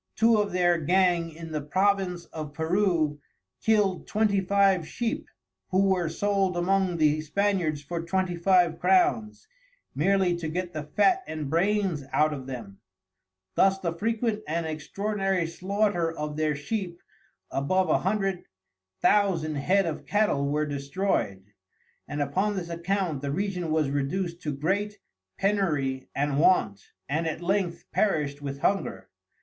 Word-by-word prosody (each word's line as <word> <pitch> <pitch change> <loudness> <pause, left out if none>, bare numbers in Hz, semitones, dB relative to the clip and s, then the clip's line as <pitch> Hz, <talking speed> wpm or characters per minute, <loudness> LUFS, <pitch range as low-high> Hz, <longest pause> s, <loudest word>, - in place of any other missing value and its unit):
Two 225 0 +4
of 205 -1 0
their 175 -1 +2
gang 175 +1 +2
in 165 0 -9
the 155 -1 -2
Province 185 +2 0
of 150 -2 -6
Peru 160 -3 +1 0.4
kild 205 -5 +2
Twenty 210 -2 +2
Five 195 -3 +2
Sheep, 235 -1 -3 0.4
who 195 +1 +3
were 180 -4 +1
sold 195 +1 0
among 185 0 +1
the 155 -1 +3
Spaniards 170 -3 0
for 170 +3 -4
Twenty 185 +1 -1
Five 175 -1 +3
Crowns, 355 - +2 0.5
merely 185 +2 +2
to 165 -2 -4
get 175 +2 -3
the 155 - -3
fat 370 - +4
and 155 -3 -4
brains 185 -2 +1
out 155 0 +2
of 135 -3 -7
them: 115 -7 -8 0.7
Thus 195 - +4
the 170 -3 -2
frequent 220 +3 -1
and 165 +2 -1
extraordinary 195 +4 -1
Slaughter 185 0 0
of 150 -2 -5
their 155 -1 0
Sheep 175 +3 -4 0.5
above 185 +7 +1
a - - +3
Hundred 195 -1 -1 0.6
Thousand 185 -7 +3
Head 185 +7 +2
of 160 -3 -4
Cattel 205 -10 +1
were 150 +1 0
destroy'd. 140 - -2 0.5
And 145 0 -1
upon 190 +9 0
this 175 -3 -4
Account 170 -3 -1
the 140 -1 -3
Region 180 0 -2
was 155 -3 +1
reduced 170 +5 -2
to 150 - -2
great 195 +9 -1 0.4
penury 155 -10 0
and 145 0 0
want, 105 - +2 0.2
and 160 +4 -1
at 160 +1 -3
length 190 -1 -1
perished 150 -8 0
with 140 -1 -5
Hunger. 200 0 -1
175 Hz, 145 wpm, -27 LUFS, 155-195 Hz, 0.7 s, Two